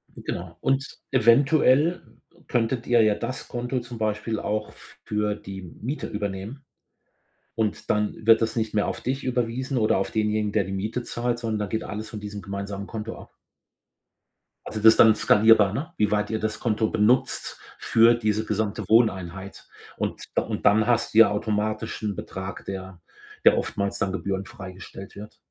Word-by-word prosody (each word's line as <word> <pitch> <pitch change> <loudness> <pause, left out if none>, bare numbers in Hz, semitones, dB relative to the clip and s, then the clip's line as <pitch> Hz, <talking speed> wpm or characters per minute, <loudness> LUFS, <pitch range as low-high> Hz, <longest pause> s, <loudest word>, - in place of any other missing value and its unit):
Genau, - - -6
und 135 0 +1 0.3
eventuell 140 +6 +4 0.5
könntet 120 0 -1
ihr 120 -1 +5
ja 105 -1 +3
das 120 +4 -5
Konto 125 +1 -3
zum 120 -1 -9
Beispiel 110 0 -2
auch 105 0 -2 0.3
für 105 -1 -1
die 95 -2 -8 0.2
Miete 135 +7 -3
übernehmen 105 +5 -5 0.9
und 110 -2 -2
dann 105 0 +1
wird 115 0 +6
das 115 - 0
nicht 110 -2 -1
mehr 105 -1 +1
auf - - -4
dich 135 +2 -2
überwiesen 125 +2 -1
oder 110 -4 +3
auf 95 - -2
denjenigen, 105 -1 0
der 105 -1 +2
die 95 - -7
Miete 105 +6 -3
zahlt, 120 0 -2
sondern 110 -3 -2
da 105 - -1
geht 110 +4 -2
alles 110 +1 -6
von 110 - -7
diesem 105 0 -7
gemeinsamen 100 0 -5
Konto 110 0 -6
ab. - - -13 1.3
Also, 110 - -5
das 110 +1 +8
dann 110 -1 +7
skalierbar, 110 -3 +5
ne, 155 +8 -4
wie 105 -1 +2
weit 105 0 +1
ihr 110 - -1
das 110 0 -3
Konto 110 -1 0
benutzt 115 +5 +1 0.2
für 115 +1 +5
diese 110 -2 0
gesamte 105 0 -2
Wohneinheit 95 -4 +1 0.3
und - - -3
da - - +3
und - - -5
dann 105 +1 +5
hast 120 -1 +1
du 110 - +5
ja 115 -2 +8
automatisch 110 +1 -2
'n 105 -2 -1
Betrag, 95 0 -7
der 95 -2 -7 0.5
der - - +7
oftmals 100 0 -2
dann 100 -3 0
gebührenfrei 95 -1 -5
gestellt 95 +1 -11
wird. 105 +1 -10
110 Hz, 170 wpm, -25 LUFS, 105-115 Hz, 1.3 s, das